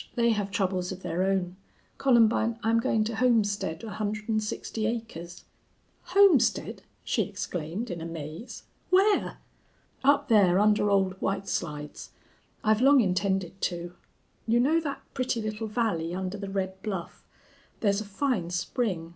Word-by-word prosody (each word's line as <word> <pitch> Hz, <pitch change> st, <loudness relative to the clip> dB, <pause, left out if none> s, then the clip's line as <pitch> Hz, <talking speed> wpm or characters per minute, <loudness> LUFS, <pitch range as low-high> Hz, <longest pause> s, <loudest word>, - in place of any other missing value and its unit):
They 235 Hz, -1 st, +3 dB
have 205 Hz, -2 st, -1 dB
troubles 185 Hz, -2 st, -1 dB
of 185 Hz, 0 st, -8 dB
their 175 Hz, -, -2 dB
own. 190 Hz, -1 st, 0 dB, 0.4 s
Columbine, 230 Hz, -3 st, +3 dB
I'm 230 Hz, +1 st, +3 dB
going 220 Hz, -1 st, +1 dB
to 220 Hz, 0 st, -3 dB
homestead 205 Hz, -8 st, +1 dB
one 220 Hz, -, -6 dB
hundred 215 Hz, +1 st, -4 dB
and 215 Hz, -1 st, +2 dB
sixty 215 Hz, +1 st, -3 dB
acres." 200 Hz, -7 st, -6 dB, 0.6 s
"Homestead!" 390 Hz, -7 st, +3 dB, 0.2 s
she -, -, 0 dB
exclaimed, 180 Hz, +7 st, -4 dB
in 170 Hz, -1 st, -5 dB
amaze. 165 Hz, -, -7 dB, 0.3 s
"Where?" 395 Hz, +3 st, +3 dB, 0.7 s
"Up 285 Hz, +1 st, +4 dB
there 195 Hz, -5 st, +5 dB
under 210 Hz, 0 st, +3 dB
Old 190 Hz, -1 st, +1 dB
White 195 Hz, 0 st, -1 dB
Slides. 150 Hz, -5 st, -4 dB, 0.5 s
I've 215 Hz, +1 st, +3 dB
long 275 Hz, +1 st, +6 dB
intended 190 Hz, -2 st, 0 dB
to. 175 Hz, -1 st, -3 dB, 0.5 s
You 230 Hz, +1 st, +3 dB
know 300 Hz, +7 st, +3 dB
that 290 Hz, -4 st, -5 dB
pretty 255 Hz, -2 st, -1 dB
little 215 Hz, 0 st, -3 dB
valley 205 Hz, -7 st, -1 dB
under 185 Hz, +1 st, -3 dB
the 200 Hz, -1 st, -5 dB
red 190 Hz, -1 st, -3 dB
bluff. 190 Hz, -5 st, -5 dB, 0.6 s
There's 200 Hz, -1 st, +2 dB
a -, -, -6 dB
fine 205 Hz, -4 st, -1 dB
spring. 180 Hz, -1 st, -2 dB
205 Hz, 145 wpm, -27 LUFS, 185-230 Hz, 0.7 s, long